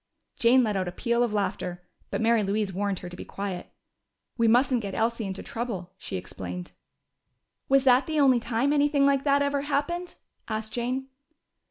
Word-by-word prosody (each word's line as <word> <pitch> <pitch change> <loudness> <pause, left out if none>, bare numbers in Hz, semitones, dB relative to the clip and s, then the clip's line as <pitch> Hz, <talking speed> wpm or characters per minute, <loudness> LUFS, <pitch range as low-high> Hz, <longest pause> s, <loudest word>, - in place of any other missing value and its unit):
Jane 250 +2 +5
let 215 -3 0
out 185 -1 -1
a - - -3
peal 235 +5 0
of 240 -2 +2
laughter, 180 -3 -2 0.3
but - - -2
Mary 230 0 +4
Louise 200 0 -1
warned 200 +1 -1
her 180 - -6
to 175 - -9
be - - -7
quiet. 195 -2 -5 0.6
"We 230 -1 +2
mustn't 245 +2 +4
get 200 -3 -5
Elsie 225 -1 0
into 190 0 -5
trouble," 200 -7 -5
she - - -4
explained. 90 0 -7 1.0
"Was 275 -1 +5
that 255 0 +5
the 310 -1 0
only 265 -4 +5
time 240 +5 0
anything 290 -1 +3
like 275 -1 +3
that 285 0 +4
ever 280 0 0
happened?" 300 +5 -2 0.3
asked 220 0 -4
Jane. 255 +3 -2
235 Hz, 180 wpm, -27 LUFS, 200-275 Hz, 1.0 s, Jane